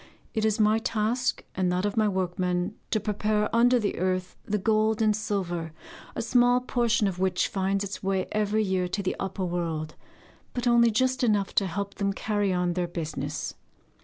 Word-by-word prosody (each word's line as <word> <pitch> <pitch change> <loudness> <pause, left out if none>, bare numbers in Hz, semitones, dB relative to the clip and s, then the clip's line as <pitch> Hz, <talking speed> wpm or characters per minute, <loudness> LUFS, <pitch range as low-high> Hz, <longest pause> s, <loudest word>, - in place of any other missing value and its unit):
It 220 -2 0
is 220 0 +1
my 215 +1 +4
task 230 +2 -1
and 185 -1 0
that 180 +2 0
of 205 - -1
my 215 -2 +3
workmen 180 0 -1 0.2
to 215 - +1
prepare 210 +1 0
under 245 +2 +5
the 210 -7 -1
earth 185 0 -1
the 210 - 0
gold 215 +1 +2
and 215 -1 +3
silver, 180 -6 -3 0.4
a - - -2
small 245 +1 +4
portion 235 -4 +1
of 185 -2 -3
which 185 -1 +1
finds 195 +1 0
its 200 0 -5
way 190 -1 0
every 215 0 +1
year 190 -2 0
to 200 +3 -3
the 185 - -1
upper 190 0 -2
world, 165 -3 -3 0.6
but 245 0 -2
only 235 -1 +5
just 255 +4 +1
enough 205 -4 +2
to 195 - +2
help 200 +3 -4
them 200 -1 -1
carry 205 -1 0
on 180 -1 +1
their 175 0 -1
business. 165 -2 -4
205 Hz, 185 wpm, -27 LUFS, 185-220 Hz, 0.6 s, under